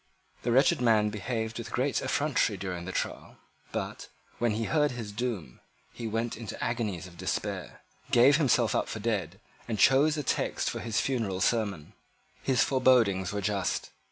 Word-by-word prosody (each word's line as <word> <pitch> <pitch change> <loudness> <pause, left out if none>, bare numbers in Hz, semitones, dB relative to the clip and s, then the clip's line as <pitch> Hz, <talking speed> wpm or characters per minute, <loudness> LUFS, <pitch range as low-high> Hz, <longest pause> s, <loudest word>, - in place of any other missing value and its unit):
The 120 - -1
wretched 130 +1 +4
man 110 -3 +3
behaved 110 +1 -3
with 115 0 -7
great 130 +3 0
effrontery 140 -8 +1
during 90 -2 -5
the 95 - -4
trial; - - -4 0.3
but, - - -4 0.3
when 120 -2 +2
he 110 +2 -1
heard 150 +4 +2
his 115 -5 -6
doom, 105 - -4 0.3
he 115 - -5
went 115 +2 -2
into 115 -3 -7
agonies 110 -7 -2
of 85 -1 -13
despair, - - -3 0.3
gave 130 +4 +6
himself 125 -6 +3
up - - 0
for 110 - -4
dead, 100 -5 -2 0.3
and 115 -2 -2
chose 135 +9 +5
a 150 - -2
text - - 0
for - - -5
his 115 -2 -1
funeral 115 -8 -1
sermon. 100 -8 0 0.5
His 130 -2 +3
forebodings 120 -9 +3
were 100 0 -2
just. 100 -1 -1
115 Hz, 165 wpm, -29 LUFS, 100-125 Hz, 0.5 s, gave